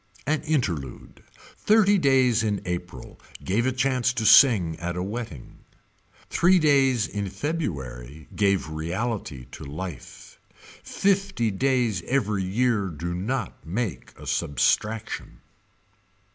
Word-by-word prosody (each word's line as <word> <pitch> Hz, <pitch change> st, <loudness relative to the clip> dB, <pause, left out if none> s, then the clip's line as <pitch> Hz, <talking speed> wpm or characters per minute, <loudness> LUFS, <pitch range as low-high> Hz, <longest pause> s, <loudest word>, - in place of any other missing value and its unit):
An 155 Hz, +2 st, 0 dB
Interlude. 100 Hz, -, -3 dB, 0.4 s
Thirty 205 Hz, -2 st, +4 dB
days 130 Hz, -6 st, +3 dB
in 105 Hz, -3 st, 0 dB
April 90 Hz, 0 st, -6 dB, 0.2 s
gave 115 Hz, +6 st, 0 dB
a -, -, +2 dB
chance 130 Hz, -1 st, +1 dB
to 115 Hz, -3 st, -2 dB
sing 105 Hz, -, +6 dB
at 85 Hz, 0 st, -3 dB
a 90 Hz, -, -2 dB
wedding. 100 Hz, -, -7 dB, 0.7 s
Three 185 Hz, +2 st, +4 dB
days 135 Hz, -, +3 dB
in 100 Hz, -1 st, -4 dB
February 75 Hz, -, -5 dB
gave 100 Hz, -4 st, +1 dB
reality 85 Hz, -, -4 dB
to -, -, -9 dB
life. 75 Hz, 0 st, -8 dB, 0.4 s
Fifty 195 Hz, -, 0 dB
days 120 Hz, -3 st, +1 dB
every 105 Hz, -7 st, 0 dB
year 105 Hz, +1 st, +1 dB
do 85 Hz, +1 st, -5 dB
not 105 Hz, +4 st, -3 dB
make 100 Hz, +3 st, -4 dB
substraction. 105 Hz, -, -1 dB
105 Hz, 110 wpm, -25 LUFS, 90-130 Hz, 0.7 s, sing